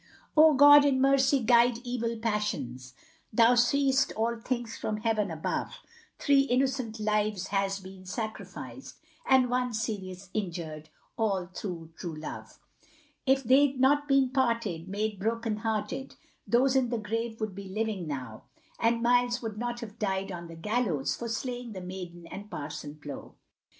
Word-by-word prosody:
Oh, 310 -1 +7
God, 290 +1 +9
in 275 -2 +3
mercy 270 0 +4
guide 235 +1 +5
evil 235 -2 -2
passions, 155 - -3 0.4
Thou 230 +2 +5
seest 270 +2 +3
all 230 +2 0
things 240 0 -3
from 215 - -3
heaven 215 -2 0
above, 160 -1 -3 0.4
Three 280 -2 +4
innocent 260 -3 0
lives 210 -2 0
has 195 0 0
been 190 -1 -12
sacrificed, 220 +3 -6 0.3
And 260 -1 +5
one 250 -1 0
serious 195 -4 -4
injured, 165 -6 -4 0.3
all 200 -5 0
through 170 -5 -6
true 170 -3 -6
love, 155 0 -8 0.7
If 270 +1 +4
they'd 265 +2 +4
not 290 +2 +4
been 275 -2 +4
parted, 230 -10 0
made 205 +1 -2
broken 225 +1 -1
hearted, 220 +4 -3 0.3
Those 255 +3 +3
in 260 -2 +3
the 240 - -1
grave 225 +2 -3
would 215 -3 -3
be 195 0 -8
living 210 -3 -2
now, 125 -7 -6 0.3
And 230 +1 +2
Miles 245 0 +2
would 215 -2 -5
not 240 0 -3
have 225 -1 -9
died 195 -1 -1
on 170 -1 -6
the 165 - -10
gallows, 185 - -1
For 235 - -5
slaying 245 0 -4
the 190 - -6
maiden 180 -2 -8
and 205 +2 -8
Parson 150 -3 -6
Plow. 145 -1 -9
220 Hz, 150 wpm, -29 LUFS, 190-245 Hz, 0.7 s, God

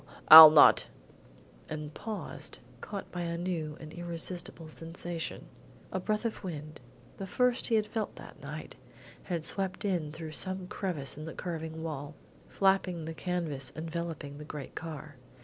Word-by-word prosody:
I'll 160 0 +14
not 150 -1 +6 0.4
" - - -25
and 150 -1 -6
paused, 215 +3 -7 0.2
caught 200 -2 -7
by 175 - -4
a 170 0 -3
new 165 -4 -3
and 155 -1 -10
irresistible 175 -1 -5
sensation. 165 +1 -3 0.5
A 185 - -2
breath 215 +4 -2
of 225 - -3
wind 155 -4 -7 0.4
the 195 - -6
first 250 +5 +1
he 230 - +2
had 215 -1 +2
felt 215 0 -4
that - - -13
night - - -8 0.5
had 170 -4 -3
swept 190 +1 -3
in 175 -7 -1
through 160 0 -7
some 185 +4 -1
crevice 170 -8 -4
in 155 - -7
the 160 - -7
curving 160 -2 -5
wall, 150 -2 -5 0.3
flapping 190 -4 +1
the 160 - -5
canvas 160 -6 -3
enveloping 160 -3 -5
the - - -7
great 150 -2 -8
car. 155 -3 -8
165 Hz, 155 wpm, -30 LUFS, 155-185 Hz, 0.5 s, I'll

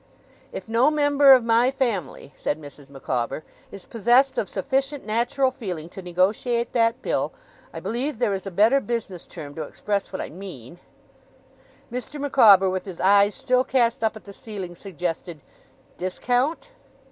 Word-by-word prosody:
'If - - -7
no 230 +5 +3
member 290 -2 +5
of 255 -2 +5
my 230 +2 +3
family,' 220 - -3
said 150 - -2
Mrs. 145 -2 -13
Micawber, 130 0 -3 0.3
'is 195 -2 -10
possessed 240 +4 +3
of 205 - -2
sufficient 275 0 -2
natural 245 +5 +1
feeling 180 -11 -6
to 190 - -9
negotiate 200 +7 0
that 230 +1 +1
bill - - -1 0.4
I - - -8
believe 255 +4 -3
there 215 -4 +1
is 195 0 -4
a - - -2
better 215 +9 +4
business 225 -8 -5
term 145 -4 -9
to 160 - -6
express 200 +6 -3
what 190 - -5
I - - -4
mean 170 - -10 0.6
' - - -31
Mr. 255 +4 -5
Micawber, 220 -9 +6
with 185 0 -2
his 185 -4 -8
eyes 200 +2 +4
still 255 -2 +1
cast 240 -3 +1
up 220 0 +1
at 215 - -11
the 200 - -11
ceiling, 195 -5 -7
suggested 175 -2 -5 0.6
'Discount. 250 - -1
220 Hz, 160 wpm, -24 LUFS, 185-255 Hz, 0.6 s, Micawber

